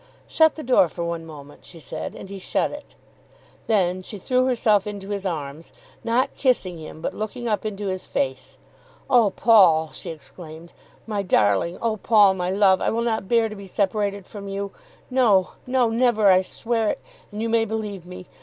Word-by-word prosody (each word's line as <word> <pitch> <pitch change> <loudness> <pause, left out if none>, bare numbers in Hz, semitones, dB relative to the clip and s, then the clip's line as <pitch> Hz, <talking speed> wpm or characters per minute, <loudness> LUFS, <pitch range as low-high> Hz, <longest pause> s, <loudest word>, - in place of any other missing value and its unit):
"Shut 320 -1 +4
the 310 - -7
door 250 -7 +4
for 170 - -6
one 170 -1 -4
moment," 145 -2 -12
she 170 - -12
said; - - -6
and - - -9
he 195 0 -8
shut - - -1
it. 290 0 -11 0.7
Then 185 -4 +1
she 205 +3 -8
threw 255 +6 +1
herself 215 -5 +2
into 200 -1 -7
his 200 -1 -2
arms, 155 -2 -6 0.3
not 235 +3 0
kissing 195 - 0
him 155 0 -10
but - - -3
looking 235 +3 -5
up 215 -1 -1
into 205 -1 -5
his 185 -1 -3
face. 130 0 -3 0.5
"Oh 235 -5 +5
Paul," 180 -8 +4
she - - -8
exclaimed, 165 0 -11 0.3
"my 210 -2 -2
darling! 170 - +2
Oh 225 -2 0
Paul, 205 -2 +5
my 180 -1 -2
love! 190 -1 +3
I - - +1
will 230 +1 -1
not 220 -4 -1
bear 230 -1 +3
to 215 - -8
be 200 -1 -10
separated 200 0 -1
from 200 -1 -9
you. 200 0 -4 0.4
No, 215 -8 +3 0.2
no; 250 -2 +2
never. 225 -3 +3
I 185 0 +5
swear 225 +3 -1
it, - - -2 0.3
and 210 - -7
you 225 - -1
may 225 0 +2
believe 210 -5 -5
me. 180 0 -9
200 Hz, 190 wpm, -23 LUFS, 180-225 Hz, 0.7 s, Oh